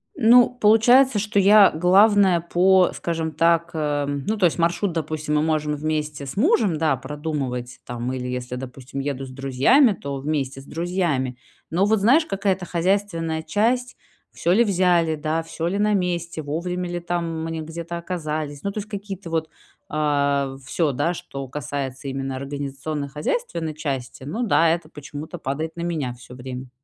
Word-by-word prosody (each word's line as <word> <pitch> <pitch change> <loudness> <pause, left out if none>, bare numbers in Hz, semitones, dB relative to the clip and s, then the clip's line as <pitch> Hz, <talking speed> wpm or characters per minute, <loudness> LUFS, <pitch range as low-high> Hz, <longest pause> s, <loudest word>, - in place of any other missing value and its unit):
Ну, 245 -1 +6
получается, 245 +2 +5
что 205 0 0
я 200 +1 +7
главная 190 +1 +4
по 180 +2 +4
скажем 165 -2 -3
так, 170 +2 +2
э, 145 -2 -1
ну 145 +10 -2
то 185 - +3
есть, 170 - +2
маршрут, 170 +3 +1
допустим, 155 -1 -2
мы 150 - +3
можем 155 -1 0
вместе 150 -1 -3
с 135 - -7
мужем, 215 - +3
да, 160 0 +2
продумывать, 140 -5 -4
там 120 +1 -4
или 125 -1 -4
если, 125 0 -4
допустим, 130 +1 -7
еду 135 -1 -3
с 130 - -10
друзьями, 135 - +4
то 140 -5 -6
вместе 135 -2 -2
с - - -16
друзьями. 165 -7 -1 0.3
Но 180 +4 +2
вот 215 0 +3
знаешь, 270 +11 +4
какая-то 195 - -1
хозяйственная 170 -3 -1
часть: 240 +9 0 0.4
всё 170 - -1
ли 225 +6 +5
взяли, 180 -5 +2
да, 155 +2 -1
всё 165 +1 -4
ли 195 +3 -1
на 210 0 +2
месте, 175 -3 -1
вовремя 175 +4 -3
ли 175 0 -3
там 170 -2 -3
мы 165 0 -4
н 160 -1 -5
где-то 170 +1 -6
оказались. 155 -4 -4
Ну 200 - -1
то 210 - -4
есть 210 +1 -7
какие-то 200 -3 -6
вот 160 -1 -1 0.4
а, 140 -2 +1
всё 155 +1 0
да, 145 +6 0
что 135 -5 -7
касается 135 0 -5
именно 135 0 -3
организационно-хозяйственной 145 - -3
части. 135 -4 -4
Ну 215 - -3
да, 165 -5 +4
это 165 -1 -1
почему-то 150 +3 -8
падает 155 +4 -4
на - - -4
меня 160 -7 -2
всё 125 +1 -13
время. 125 0 -7
160 Hz, 170 wpm, -23 LUFS, 140-185 Hz, 0.4 s, я